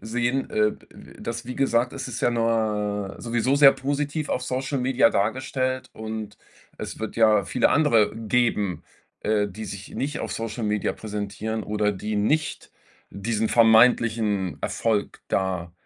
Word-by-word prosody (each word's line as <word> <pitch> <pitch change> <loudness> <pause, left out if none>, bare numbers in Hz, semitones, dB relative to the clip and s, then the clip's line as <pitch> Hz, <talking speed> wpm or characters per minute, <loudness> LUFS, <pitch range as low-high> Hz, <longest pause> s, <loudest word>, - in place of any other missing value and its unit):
sehen, 120 +4 -1
äh, 105 0 +2
d - - -16 0.3
äh, - - -14
dass 115 0 -5
wie 125 - -5
gesagt 125 -2 +1
es 135 -1 -5
ist 125 0 -5
ja - - +3
ne 105 -4 0
sowieso 120 +3 0
sehr 140 -1 +8
positiv 145 +2 -2
auf 125 - -1
Social 130 +2 -2
Media 125 -1 +3
dargestellt 130 +5 -1
und 110 -1 -6 0.4
es - - -7
wird 110 -1 -5
ja 110 -3 +4
viele 125 - +2
andere 120 -9 +3
geben, 110 -4 0 0.4
äh, 105 -1 +1
die 110 +3 -8
sich 100 -2 -8
nicht 145 +3 -3
auf - - -4
Social 115 0 -4
Media 105 -1 0
präsentieren 105 +1 -4
oder 105 0 0
die 105 +2 -4
nicht 150 +9 0 0.4
diesen 110 +2 -2
vermeintlichen 110 -4 +4
Erfolg 110 -3 -1
da 95 -3 -1
115 Hz, 150 wpm, -24 LUFS, 105-125 Hz, 0.4 s, sehr